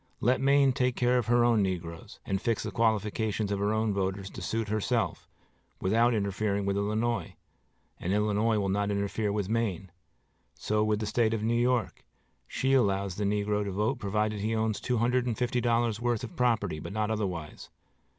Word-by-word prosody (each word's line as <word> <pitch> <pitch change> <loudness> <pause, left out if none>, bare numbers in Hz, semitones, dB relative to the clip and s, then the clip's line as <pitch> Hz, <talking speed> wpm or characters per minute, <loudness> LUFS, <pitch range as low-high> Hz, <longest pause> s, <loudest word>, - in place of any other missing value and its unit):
Let 125 +3 +2
Maine 140 -1 +4
take 125 -1 0
care 125 0 +2
of 115 - -3
her 120 0 +4
own 115 -3 +4
negroes, 85 -3 -4
and 95 -1 -1
fix 115 -3 0
the - - -4
qualifications 110 -1 0
of 100 - -1
her 100 +1 +1
own 110 -1 +1
voters 95 0 -2
to - - -8
suit 115 -1 -2
herself, 110 -1 -1 0.5
without 115 +5 +3
interfering 100 0 -1
with 100 0 0
Illinois; 110 +4 -1 0.6
and 90 - -2
Illinois 105 +2 +2
will 100 -2 0
not 100 +1 0
interfere 100 +1 -1
with 100 -2 -1
Maine. 100 -5 -2 0.6
So 105 0 0
with 110 0 0
the - - -1
State 110 +1 +1
of 105 - -4
New 115 +1 +1
York. 120 -2 0 0.4
She 135 +1 0
allows 100 -7 +1
the 105 - -1
negro 105 +1 0
to 100 - -4
vote 105 +7 -1
provided 105 0 -1
he 110 +3 -1
owns 110 -1 -1
two 125 -1 0
hundred 125 +2 +1
and 115 -3 -1
fifty 125 0 0
dollars' 115 -2 +1
worth 120 -2 0
of 120 - -7
property, 110 -10 +1
but 100 - -7
not 110 0 -1
otherwise. 90 -8 -4
110 Hz, 190 wpm, -29 LUFS, 100-120 Hz, 0.6 s, Maine